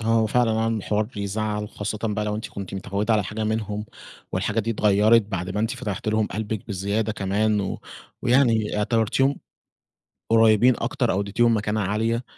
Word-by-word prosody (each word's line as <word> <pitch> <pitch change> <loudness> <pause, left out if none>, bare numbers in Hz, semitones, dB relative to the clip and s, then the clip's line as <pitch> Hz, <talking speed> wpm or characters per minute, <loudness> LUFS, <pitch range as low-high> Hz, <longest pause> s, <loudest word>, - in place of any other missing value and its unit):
آه، 110 - -6
هو 115 -1 +3
فعلًا 120 +1 +2
عمل 115 -2 0
حوار 105 +2 0
بيزعّل، 105 -1 -3
خاصّةً 105 0 -4
بقى 105 0 -1
لو 105 0 -2
أنتِ 110 +3 -5
كُنتِ 100 -1 -7
متعوِّدة 100 +3 -1
على 105 -3 +1
حاجة 110 +2 -4
منهم، 105 -1 -2 0.5
والحاجة 110 +1 0
دي 115 +2 -2
اتغيّرت 105 +2 +4
بعد 95 -3 -4
ما 105 +2 -2
أنتِ 115 +1 0
فتحتِ 110 -5 -4
لهم 110 0 +1
قلبكِ 110 0 -4
بزيادة 100 +3 -1
كمان، 105 +1 0
و 95 - -4 0.4
ويعني 115 -4 +2
اعتبرتيهم 115 +6 +1 0.9
قُريبين 115 +2 +5
أكتر - - 0
أو 95 - 0
أدّيتيهم 115 +3 +2
مكانة 105 +1 -1
عالية، 115 +5 0
105 Hz, 170 wpm, -24 LUFS, 105-115 Hz, 0.9 s, قُريبين